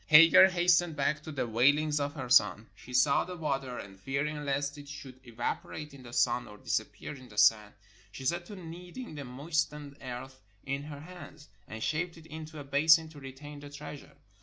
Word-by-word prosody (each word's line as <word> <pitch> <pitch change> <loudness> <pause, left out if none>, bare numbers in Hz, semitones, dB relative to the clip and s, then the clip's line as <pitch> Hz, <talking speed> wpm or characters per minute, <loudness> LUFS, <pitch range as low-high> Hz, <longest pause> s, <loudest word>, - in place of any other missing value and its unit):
Hagar 165 +4 +9
has 180 -1 +3
tened 170 -2 +2
back 145 +1 0
to 155 - -8
the 140 -4 -1
wailings 145 +6 +3
of 145 +1 -2
her 130 -4 -5
son. 110 -2 +4
She 125 - -14
saw 130 +3 +4
the 180 0 -7
water, 135 -5 -2
and 95 -1 -9
fearing 140 +6 -2
lest 140 0 -1
it 145 0 -11
should 130 -3 -9
evaporate 120 +5 -4
in 140 - -12
the 120 -2 -11
sun 120 0 +2
or 105 - -12
dis - - +1
appear - - -9
in 130 -3 -12
the 105 - -14
sand, 105 0 +4 0.4
she 130 - -8
set 175 +5 0
to 205 - -8
kneading 180 +6 -8
the 145 -2 -6
moistened 145 +1 -2
earth 130 +1 -7 0.2
in 135 +1 -2
her 145 -1 -8
hands, 160 -3 -11 0.2
and 110 0 -6
shaped 165 +2 -1
it 160 - -14
into 155 -1 -8
a - - -6
basin 155 +4 +5
to 155 -2 -12
retain 140 +2 -9
the 145 0 -10
treasure. 145 -1 -10
145 Hz, 205 wpm, -31 LUFS, 130-155 Hz, 0.4 s, Hagar